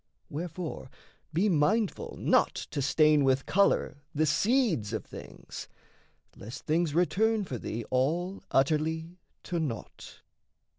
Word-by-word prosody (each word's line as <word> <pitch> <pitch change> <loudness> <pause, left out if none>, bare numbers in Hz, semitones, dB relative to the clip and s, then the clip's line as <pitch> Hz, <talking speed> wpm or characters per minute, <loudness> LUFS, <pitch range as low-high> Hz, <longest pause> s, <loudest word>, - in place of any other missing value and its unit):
Wherefore 165 -2 -5 0.4
be 175 +7 +2
mindful 195 +5 +1
not - - +3 0.2
to 140 - -2
stain 150 +2 +4
with 135 0 +2
colour 195 -5 +2 0.2
The 155 +2 +3
seeds 190 - +2
of - - -3
things, - - -9 0.7
lest 110 +5 -9
things 160 -1 +1
return 215 +5 +2
for 130 -10 -5
thee 115 +2 -4
All 165 +9 0
utterly 160 +5 0 0.2
to 175 - -2
naught. 135 -9 -6
160 Hz, 115 wpm, -29 LUFS, 140-180 Hz, 0.7 s, stain